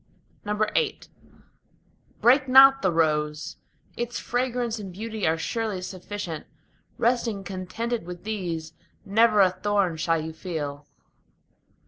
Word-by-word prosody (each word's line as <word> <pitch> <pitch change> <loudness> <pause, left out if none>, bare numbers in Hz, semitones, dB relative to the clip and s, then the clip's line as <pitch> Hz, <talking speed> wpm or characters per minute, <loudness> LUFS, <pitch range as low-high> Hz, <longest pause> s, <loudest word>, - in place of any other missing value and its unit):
VIII 215 - 0 1.2
Break 260 +3 +5
not 270 +1 +8
the 190 - +2
rose; 150 -2 0 0.4
its 240 0 -3
fragrance 245 -2 -1
and 195 -3 -7
beauty 215 +1 -3
are 160 +1 +2
surely 220 +2 -2
sufficient: 185 -2 -6 0.5
Resting 230 -4 0
contented 195 +3 -4
with 180 -1 -8
these, 175 -7 -4 0.3
never 215 +1 +4
a 185 -2 +5
thorn 190 -2 0
shall 165 +1 +1
you 160 +1 -5
feel. 150 -4 -5
200 Hz, 110 wpm, -25 LUFS, 165-230 Hz, 1.2 s, not